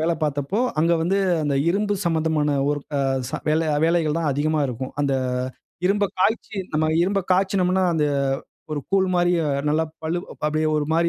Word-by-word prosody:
வேலைபாத்தப்போ, 155 - -1 0.2
அங்க 165 +2 +3
வந்து 190 +4 +1 0.2
அந்த 145 -2 0
இரும்பு 205 +2 0
சம்பந்தமான 160 -3 +1
வொர்க் 145 0 -3
அ, - - +1 0.3
ச - - -17 0.2
வேலை 160 +1 +2 0.2
வேலைகள் 165 -2 +1
தான் 160 -3 0
அதிகமா 150 +3 0
இருக்கும். 130 +1 -5
அந்த 140 -1 +1 0.7
இரும்ப 200 +2 +2 0.2
காய்ச்சி 210 +1 0 0.2
நம்ம 155 0 +2
இரும்ப 195 +2 +1
காய்ச்சினம்ன்னா, 190 0 +2
அந்த 150 -2 +2 0.7
ஒரு 150 - -2
கூழ் 190 -1 +3
மாரிய 175 0 +3 0.3
நல்லா 160 +2 +2 0.2
பழு 165 +2 0 0.3
அப்பிடியே 155 +1 +1
ஒருமாரி 160 +3 +1
160 Hz, 150 wpm, -23 LUFS, 150-185 Hz, 0.7 s, அங்க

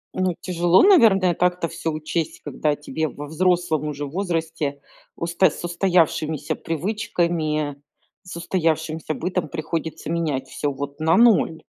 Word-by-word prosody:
Ну, 185 -2 0
тяжело, 175 0 +3
наверное, 220 - +6
так-то 180 0 0
всё 160 - -3
учесть, 155 +1 -3
когда 150 -1 -1
тебе, 155 +2 -3
во 145 0 -8
взрослом 165 -1 +1
уже 145 -1 -4
возрасте, 165 -3 -2 0.4
усто 170 +2 +2
с - - -9
устоявшимися 165 -4 +1
привычками, 165 -5 -2 0.4
с 185 -2 -10
устоявшимся 160 -2 -1
бытом, 180 -1 -2
приходится 160 +1 -4
менять 150 -6 -1
всё 145 +1 -2
вот 140 +1 -6
на 160 +4 +3
0. 215 -8 +4
165 Hz, 125 wpm, -23 LUFS, 155-180 Hz, 0.4 s, наверное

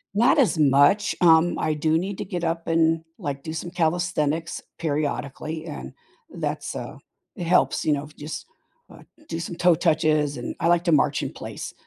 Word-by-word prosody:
Not 245 +7 +4
as 220 -10 +3
much, 145 +8 +4
um, 165 0 +5
I 155 -1 0
do 155 +1 +1
need 190 +2 -3
to - - -4
get 180 -2 -4
up 165 0 -1
and, 165 0 +2 0.2
like, 140 -1 -4
do 160 - -5
some 170 +2 -5
calisthenics 165 -2 -1 0.2
periodically, 155 +1 -3
and 150 - -7 0.4
that's, - - -4
uh - - -6 0.4
it 180 - -5
helps, 180 -1 +2
you 155 - +3
know, 145 +1 -3
just, 150 +2 -6 0.4
uh, - - -14 0.3
do 165 - -3
some 170 +1 -5
toe 175 0 +4
touches 155 -3 +2
and - - -5
I - - +1
like 175 0 +3
to 170 - +2
march 150 -1 +3
in - - -3
place. - - -7
160 Hz, 180 wpm, -24 LUFS, 150-175 Hz, 0.4 s, um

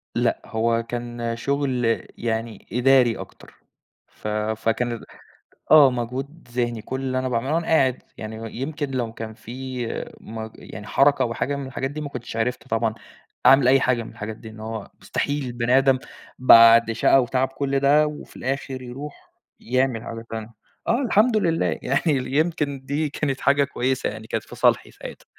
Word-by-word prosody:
لأ، 120 0 +1
هو 115 0 0
كان 120 0 -4
شغل 130 -3 0 0.2
يعني 115 -2 -3
إداري 125 -1 +4
أكتر، - - -12 0.5
ف - - -10
فكان 110 +3 -1
ال 115 - -6 0.7
آه 150 -3 +9
مجهود 130 +6 -5
ذهني، 120 -2 -1
كل 130 +4 -5
اللي 130 -1 -1
أنا 130 0 -2
باعمله 125 +5 -1
وأنا 165 0 0
قاعد 130 -5 +2
يعني 110 0 -6
و 115 - -6
يمكن 140 +5 -4
لو 120 -3 -2
كان 110 -1 -7
في 125 +2 -6 0.3
مج 110 0 -7
يعني 105 0 -10
حركة 140 +1 +3
أو 115 - -1
حاجة 140 +5 -1
من 140 -1 -5
الحاجات 135 +1 -3
دي 150 +1 -5
ما 145 - -5
كنتش 120 -3 -7
عرفت 125 +2 -2
طبعًا 115 0 0 0.5
أعمل 135 -2 +7
أي 135 +1 +6
حاجة 120 -3 +1
من - - -10
الحاجات 105 +1 -6
دي، 110 - -10
إن 110 0 -12
هو 110 -1 -6
مستحيل 145 -1 -2
البني 120 +1 +1
آدم 135 -1 +4 0.4
بعد 115 -2 +8
شقى 130 +4 +4
وتعب 130 +2 0
كل 135 0 -1
ده 150 +2 +4
وفي 150 - -9
الآخر 135 0 -3
يروح 135 +4 -9 0.3
يعمل 125 -1 0
حاجة 115 0 -7
تانية، 110 0 -5 0.4
آه 240 +4 +2
الحمد 225 -1 +3
لله 165 -5 +1
يعني 135 +2 +1 0.2
ال 130 +1 -5
يمكن 145 -4 0
دي 145 +2 -1
كانت 135 -2 -2
حاجة 140 0 +4
كويسة 130 -1 -1
يعني 110 +1 -9
كانت - - -2
في - - -12
صالحي - - +2
ساعتها. - - -10
125 Hz, 175 wpm, -23 LUFS, 115-140 Hz, 0.7 s, آه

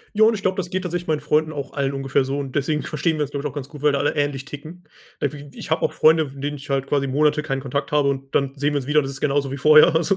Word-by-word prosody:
Ja, 220 - +6
und 225 0 +4
ich 205 - -5
glaube, 190 +1 0
das 180 -1 -2
geht 185 +1 -2
tatsächlich 175 -1 -4
meinen 155 -2 +1
Freunden 155 +1 +1
auch 140 -2 -6
allen 140 -1 -1
ungefähr 135 0 0
so 135 +2 -3
und 135 -2 -5
deswegen 150 +1 0
verstehen 155 +1 -1
wir 150 - -1
uns, 145 - -3
glaube 140 +1 -4
ich, - - -2
auch 140 - -16
ganz 140 -2 -6
gut, 150 -3 -11
weil 150 -1 +3
da 140 - +1
alle 145 - 0
ähnlich 145 -2 -1
ticken. 155 +5 -10 0.4
Irgendwie 145 0 -5
ich - - -8
habe 160 - +2
auch - - +1
Freunde, 155 -1 +4
von 135 0 -12
denen 145 0 -3
ich 145 +2 -12
halt 135 -1 0
quasi 140 -1 0
Monate 150 +3 +2
keinen 135 -3 -3
Kontakt 140 +3 -3
habe 145 -2 +3
und 135 0 -6
dann 135 -1 +1
sehen 145 +1 0
wir - - +1
uns 125 - -8
wieder, 150 +1 +4
das 135 -1 -4
ist 135 - -5
genauso 140 -1 +1
wie 140 - -4
vorher 155 +3 +6
also 180 +4 +2
145 Hz, 320 wpm, -22 LUFS, 140-155 Hz, 0.4 s, Ja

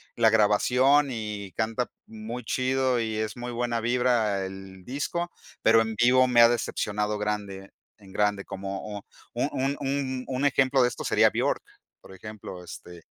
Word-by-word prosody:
la 115 -1 +5
grabación 125 +7 +4
y 105 -4 -5
canta 115 +2 -1 0.2
muy 110 +3 -7
chido 130 -1 +1
y 110 -1 -2
es 110 +2 -2
muy 120 0 -6
buena 120 -1 -1
vibra 120 -5 +1
el 95 -1 -10
disco, 170 +6 -3 0.3
pero 115 0 +5
en 110 -1 -2
vivo 125 +3 +5
me 125 -1 +3
ha 115 - +9
decepcionado 105 -3 -1
grande, 100 -2 -4 0.3
en 95 -2 -16
grande, 105 -1 0
como 95 0 -6
un 105 -1 -6 0.3
un - - 0
un 135 +2 -1
un 135 -2 -2
un 135 +1 -1
ejemplo 135 -1 +3
de 125 - +5
esto 120 - -5
sería - - +4
Björk, - - 0 0.4
por 95 - -14
ejemplo, 95 -2 -9
este, 85 -1 -11
110 Hz, 165 wpm, -26 LUFS, 105-125 Hz, 0.4 s, ha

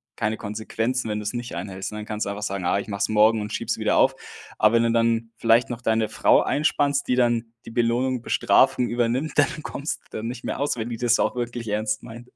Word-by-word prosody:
keine 110 +1 -1
Konsequenzen, 110 +3 -3
wenn 105 - -2
du 105 - -6
es 105 - -2
nicht 120 0 -5
einhältst. 95 +1 -5
Ne, 105 - -5
dann 105 - -6
kannst 105 0 -3
du - - -3
einfach 100 +1 -5
sagen: 100 -3 -3
„Ah, 90 - +2
ich 100 - -7
mache 100 -1 -4
es - - +1
morgen 110 +1 +4
und 105 +1 -5
schiebe 105 - -3
sie - - -1
wieder - - +1
auf“. - - +4 0.4
Aber 110 +2 +4
wenn 115 - +4
du 115 - +2
dann 115 0 +1
vielleicht 115 +1 +3
noch 120 0 -5
deine 110 -2 +1
Frau - - +4
einspannst, 145 -1 +1
die 125 - +2
dann 120 -2 +1
die - - -9
Belohnung, 120 +1 +1
Bestrafung 125 0 +3
übernimmt, 120 +5 0
dann 150 +1 +2
kommst 140 - -4
dann 110 +1 -4
nicht 125 +1 -6
mehr - - -3
aus, 145 - 0
wenn 115 0 -4
die 115 - -4
das 120 0 +2
auch - - +1
wirklich 120 -2 -4
ernst 105 +1 -1
meint. 120 +1 -11
115 Hz, 250 wpm, -24 LUFS, 110-120 Hz, 0.4 s, morgen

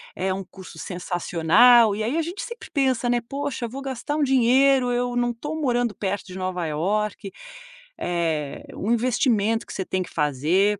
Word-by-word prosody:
É 190 0 -1
um 195 +1 -4
curso 185 -2 -13
sensacional," 185 +6 +4
e 215 - -2
aí 245 +8 -1
a - - +2
gente 345 +5 -5
sempre 475 0 -9
pensa, 260 -4 +1
né, 240 0 +2
"Poxa, 275 0 -4
vou 265 +4 -7
gastar 270 +2 -4
um 300 - +1
dinheiro, 260 0 +4
eu 245 0 -1
não 240 0 +1
tô 295 +7 -5
morando 245 -6 0
perto 200 0 -3
de 185 0 -8
Nova 185 -2 -3
Iorque," 200 +5 -2 0.7
eh, 165 -5 -2
um 210 - -2
investimento 230 -2 +1
que - - -9
você 190 - -3
tem 185 0 -1
que - - -12
fazer. 165 +8 +1
225 Hz, 180 wpm, -24 LUFS, 185-255 Hz, 0.7 s, sensacional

